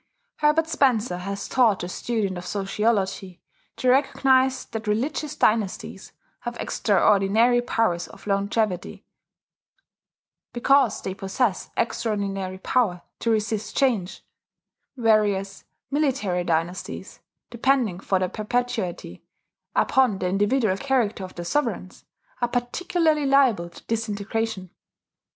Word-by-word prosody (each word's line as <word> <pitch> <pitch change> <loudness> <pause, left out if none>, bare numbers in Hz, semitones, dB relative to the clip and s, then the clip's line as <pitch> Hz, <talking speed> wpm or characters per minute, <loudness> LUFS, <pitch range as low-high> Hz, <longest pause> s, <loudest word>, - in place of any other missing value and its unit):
Herbert 305 +2 +3
Spencer 250 - +1
has 195 +2 -5
taught 230 -7 +3
the 175 - -4
student 205 0 -2
of 175 0 -7
sociology 195 -2 -1 0.4
to 255 - -2
recognize 265 0 +3
that 225 -1 -6
religious 270 +7 -1
dynasties 215 -3 0 0.3
have 240 0 -6
extraordinary 210 +4 +3
powers 225 -8 0
of - - -15
longevity, 200 -1 -1 1.5
because 255 -2 +3
they 190 - -3
possess 195 +2 -1
extraordinary 200 -5 -2
power 190 -3 0 0.2
to 230 - -1
resist 220 -1 -1
change; 225 -9 0 0.7
whereas 210 -5 +1 0.3
military 265 -12 0
dynasties, 170 +2 -3 0.3
depending 240 -6 +1
for 195 0 0
their 185 0 0
perpetuity 215 - -3 0.5
upon 255 -7 +3
the 185 - -2
individual 205 +1 +1
character 240 -6 0
of 185 - -9
their 175 - -6
sovereigns, 295 +10 -2 0.4
are 240 - +2
particularly 305 +5 0
liable 255 -11 +3
to 170 - -15
disintegration. 220 -3 -3
215 Hz, 105 wpm, -24 LUFS, 195-250 Hz, 1.5 s, Herbert